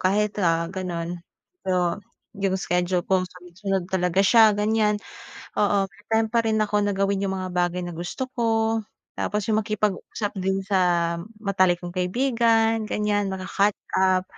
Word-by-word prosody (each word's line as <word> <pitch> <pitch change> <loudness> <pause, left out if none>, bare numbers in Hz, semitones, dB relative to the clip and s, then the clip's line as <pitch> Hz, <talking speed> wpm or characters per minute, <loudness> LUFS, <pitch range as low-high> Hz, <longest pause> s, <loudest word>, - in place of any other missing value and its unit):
kahit, 205 +3 +1
ah, 165 -1 +2
gano'n. 175 -2 -4 0.5
So 180 -1 +1 0.4
'yong 195 -1 +1
schedule 180 0 0
ko 185 -1 +2
sunod-sunod 180 +1 -4
talaga 180 0 +1
siya, 220 0 +7
ganyan. 210 0 +2 0.6
Oo, 200 -1 +3
may 205 +4 -21
time 220 0 +2
pa 235 - +4
rin 220 0 +2
ako 210 -1 +1
gawin 195 0 +1
'yong 190 - -2
mga 185 0 -4
bagay 180 0 0
na 175 - -5
gusto 195 +10 -4
ko, 225 -1 +1 0.4
tapos 210 0 -1
yung 215 0 +3
makipag-usap 210 0 -2
din 190 +1 0
sa 175 -3 +2 0.3
matalik 185 -3 +2
kong 175 - -5
kaibigan 225 +2 +2
ganyan, 205 -1 0
maka-catch 195 +2 0 0.2
up. 185 -1 +3
195 Hz, 145 wpm, -24 LUFS, 180-210 Hz, 0.6 s, siya